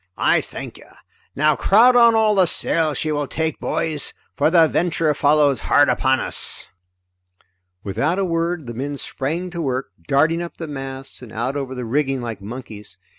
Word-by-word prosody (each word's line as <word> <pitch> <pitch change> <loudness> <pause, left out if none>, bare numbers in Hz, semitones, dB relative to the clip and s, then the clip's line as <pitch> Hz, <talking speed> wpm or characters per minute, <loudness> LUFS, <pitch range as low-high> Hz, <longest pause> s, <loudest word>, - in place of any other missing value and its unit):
"I - - +3
thank - - -9
you. - - -17 0.5
Now 150 +1 +3
crowd 220 - +5
on 235 -1 +6
all 220 -1 +3
the 190 -3 +3
sail 155 0 -1
she 155 - -1
will 145 -1 -1
take, 160 +1 -2
boys, 155 -3 -2 0.2
for 145 - +2
the 165 -1 +5
Venture 165 -2 +1
follows 145 -3 +3
hard 145 +4 +3
upon 130 0 +2
us!" - - -3 1.2
Without 130 - -1
a 195 - +1
word 170 -2 -1
the 120 - -6
men 140 +4 -4
sprang 165 +8 -4
to 170 - -4
work, 130 -6 -2 0.2
darting 160 +5 +2
up 170 - -7
the 165 - -6
masts 135 -2 -7
and 120 -4 -11
out 120 +5 -3
over 135 -2 -4
the 125 -1 -5
rigging 135 +2 0
like 115 -4 -6
monkeys. 105 -3 -9
145 Hz, 175 wpm, -21 LUFS, 130-165 Hz, 1.2 s, on